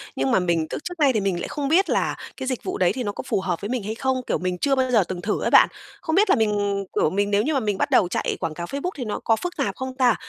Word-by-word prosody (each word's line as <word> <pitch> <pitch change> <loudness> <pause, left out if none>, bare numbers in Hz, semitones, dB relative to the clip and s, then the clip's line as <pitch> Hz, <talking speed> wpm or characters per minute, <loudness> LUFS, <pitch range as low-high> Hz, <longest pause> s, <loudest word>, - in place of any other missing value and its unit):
nhưng 135 0 0
mà - - +4
mình 170 -3 0
tức - - -4
trước 355 -1 -6
nay 280 -3 +4
thì 220 - +1
mình 190 -3 -1
lại - - -4
không 290 -2 -3
biết 350 +7 +3
là - - +1 0.2
cái 265 - -5
dịch 255 -2 -2
vụ - - -3
đấy 180 -1 +2
thì 255 - -3
nó 205 - -2
có - - -7
phù - - 0
hợp 180 -3 -2
với 205 - -4
mình 250 -3 -2
hay 215 +2 -4
không, 260 +1 -1
kiểu, - - +1
mình 180 0 -2
chưa 275 +7 +1
bao 260 -1 +1
giờ 220 -5 +5
từng 180 -1 -5
thử 210 - -1
á - - +1
bạn. - - +7 0.3
Không 320 - -1
biết 405 +2 +4
là - - +6
mình, 205 -2 0
kiểu, - - +3
mình 200 +4 0
nếu 205 +1 +3
như 310 - 0
mà 275 - +2
mình 210 -5 -1
bắt - - 0
đầu 185 - +5
chạy 175 - -1
quảng 160 - -3
cáo 170 +2 -5
Facebook 280 - -3
thì 260 -5 -5
nó 210 - -3
có 225 - +3
phức 355 +9 -5
tạp 280 - -1
không 260 -1 -5
ta, 250 -3 +4
220 Hz, 335 wpm, -23 LUFS, 190-265 Hz, 0.3 s, bạn